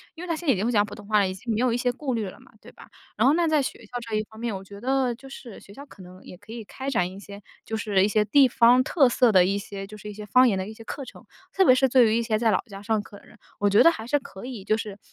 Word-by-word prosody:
因 335 - -9
为 - - -7
他 335 - -1
现 340 - -9
在 270 - +5
已 - - -2
经 190 - -2
会 240 - 0
讲 205 -3 +3
普 210 - -11
通 205 - -13
话 215 0 +2
了， 200 - +2
已 185 - -4
经 220 +5 -6
没 - - -1
有 250 -1 +1
一 - - 0
些 245 0 0
顾 265 +1 -4
虑 225 -3 -2
了 - - -14
嘛， - - -20
对 - - -14
吧？ - - -16 0.3
然 - - +3
后 280 - +5
那 340 +1 +1
在 305 -3 +2
学 - - -5
校 - - -22 0.2
这 220 - -3
一 215 - 0
方 220 0 -14
面， 230 -3 -3
我 190 - -7
觉 200 +1 -12
得 260 0 0
就 270 +3 -14
是 250 -4 -11
学 200 - -16
校 280 +6 -11
可 195 - -15
能 185 +1 -14
也 180 - -12
可 205 +3 -13
以 230 -1 -7
开 265 +6 -8
展 180 -9 0
一 190 - -11
些， 200 0 -11 0.2
就 220 - -4
是 205 -4 +1
一 - - +1
些 215 0 +2
地 270 +5 +5
方 245 +1 +4
特 275 -2 +3
色 245 -1 +3
的 185 -3 +5
一 195 +2 0
些， 195 -1 -7
就 215 - -11
是 210 - -11
一 - - -8
些 210 +1 -9
方 250 +5 +5
言 215 - +1
的 190 0 -4
一 - - -9
些 225 - -12
课 275 - -7
程， - - -13 0.3
特 385 - +3
别 255 - +7
是 265 +1 +2
对 250 -1 +5
于 220 - +1
一 - - +1
些 220 -1 0
在 225 0 +2
老 190 - +2
家 200 -2 -10
上 215 0 0
课 200 0 -14
的 - - -19
人， - - -19 0.2
我 205 - +2
觉 205 - +5
得 - - +8
还 225 -9 -7
是 290 +3 +1
可 195 -5 -11
以 245 -6 -7
就 215 +2 +1
是， 210 -3 -7
220 Hz, 380 characters per minute, -25 LUFS, 200-255 Hz, 0.3 s, 得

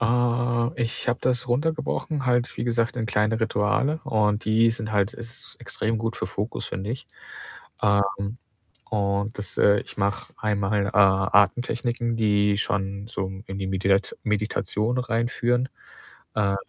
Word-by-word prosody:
Äh, 120 +1 +1
ich 115 +2 -3
habe 120 +1 +1
das 125 0 +1
runtergebrochen 155 +1 -1
halt, 120 -1 +1
wie - - -2
gesagt, 120 +1 0
in 115 - -1
kleine 105 0 +1
Rituale 110 +8 +1
und 105 -1 +1
die 110 +1 +4
sind 115 -2 -4
halt 100 +1 +2
ist 115 0 -10
extrem 110 +1 -2
gut 115 +1 -2
für - - -3
Fokus, 100 +4 -4
finde 100 +3 -4
ich. 125 - -5 0.8
Ähm, 100 +2 +1 0.5
und 100 0 0
das, 105 - -6
äh 100 0 +5
ich - - -11
mache 100 +2 -1
einmal, 100 -1 0
äh, - - -1
Atemtechniken, 110 +5 +3
die 105 -2 +3
schon 100 -1 -2
so 95 -4 -3 0.2
in 95 0 -5
die 95 - -2
Medidat 95 +1 +1
Meditation 105 +2 0
reinführen. 120 +1 0 0.7
Äh, 100 -2 +2
110 Hz, 145 wpm, -25 LUFS, 100-120 Hz, 0.8 s, äh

